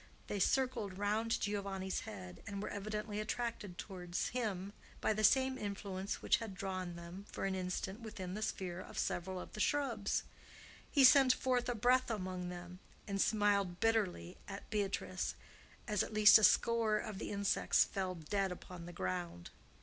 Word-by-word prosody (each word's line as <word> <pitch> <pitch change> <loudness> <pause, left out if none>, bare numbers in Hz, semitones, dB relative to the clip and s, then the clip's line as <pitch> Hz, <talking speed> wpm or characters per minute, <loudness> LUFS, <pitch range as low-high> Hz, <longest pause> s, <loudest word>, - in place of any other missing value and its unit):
They 205 - -3
circled 230 -4 +1
round 215 +3 +1
Giovanni's 195 -2 -2
head, 90 -3 -8
and 200 -1 -4
were 205 - -3
evidently 210 +1 -3
attracted 215 -4 -3
towards 180 -3 -3
him 205 -5 -3 0.3
by - - +2
the 215 +1 -2
same 260 +4 +4
influence 200 -1 -4
which - - +4
had 220 -4 -6
drawn 185 -2 -4
them 170 +4 -9
for - - -3
an 195 - 0
instant 190 +2 -3
within 210 -5 -6
the 210 - -4
sphere 185 -4 -3
of - - -10
several 185 +1 -2
of - - -9
the - - -7
shrubs. 235 -5 +1 0.7
He 280 - +4
sent 260 0 +8
forth 250 -1 0
a 245 - 0
breath 250 +3 +3
among 185 -4 -3
them, 180 0 -8 0.3
and 195 -1 0
smiled 200 -4 +2
bitterly 210 -5 0
at 200 0 -7
Beatrice 195 -3 -1 0.5
as 210 -4 +1
at 215 - -4
least 215 +1 +9
a - - -2
score 230 -1 +4
of 210 -2 -5
the - - -4
insects 200 0 +3
fell 185 -2 -3
dead 190 +4 -1
upon 180 -1 -8
the 175 - -8
ground. 85 - -4
200 Hz, 165 wpm, -36 LUFS, 185-215 Hz, 0.7 s, least